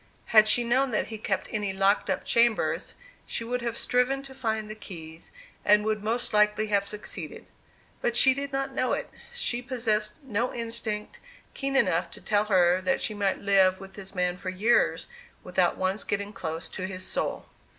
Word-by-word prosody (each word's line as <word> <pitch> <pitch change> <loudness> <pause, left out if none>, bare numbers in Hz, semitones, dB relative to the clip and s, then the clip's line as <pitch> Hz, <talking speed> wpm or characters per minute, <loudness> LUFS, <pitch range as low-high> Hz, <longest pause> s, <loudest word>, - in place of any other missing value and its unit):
Had 215 -1 +8
she 240 +2 +5
known 260 +3 +2
that 215 - -1
he 220 -1 -6
kept - - -2
any 210 -3 -1
locked 195 +1 +2
up 190 - -1
chambers, 235 -1 +1 0.3
she - - -3
would 245 +2 -2
have 235 -1 -3
striven 255 +2 +1
to 270 -1 -10
find 220 -5 -2
the 215 - -6
keys, 165 -6 -9 0.3
and 210 0 +4
would 215 -1 0
most 235 +2 -1
likely 210 0 +3
have 200 -1 +2
succeeded. 210 0 -6 0.6
But 240 0 0
she 265 - +7
did 280 +1 -4
not 270 0 -2
know - - 0
it. - - -3 0.2
She 480 - -1
possessed 230 -4 0
no 240 -1 -1
instinct 225 -2 -2 0.3
keen 275 0 -2
enough 180 -8 +2
to - - -11
tell 210 0 +1
her 185 -3 +3
that 270 +8 +1
she 215 - -1
might 200 -2 -1
live 190 -2 +4
with 190 0 -11
this 195 0 -8
man 180 -1 0
for 185 +1 -5
years 210 +6 +2 0.4
without - - +1
once 190 +2 -1
getting 200 +1 -3
close 165 -3 -5
to 185 - -5
his 185 -1 -3
soul. - - -1
215 Hz, 185 wpm, -27 LUFS, 195-240 Hz, 0.6 s, Had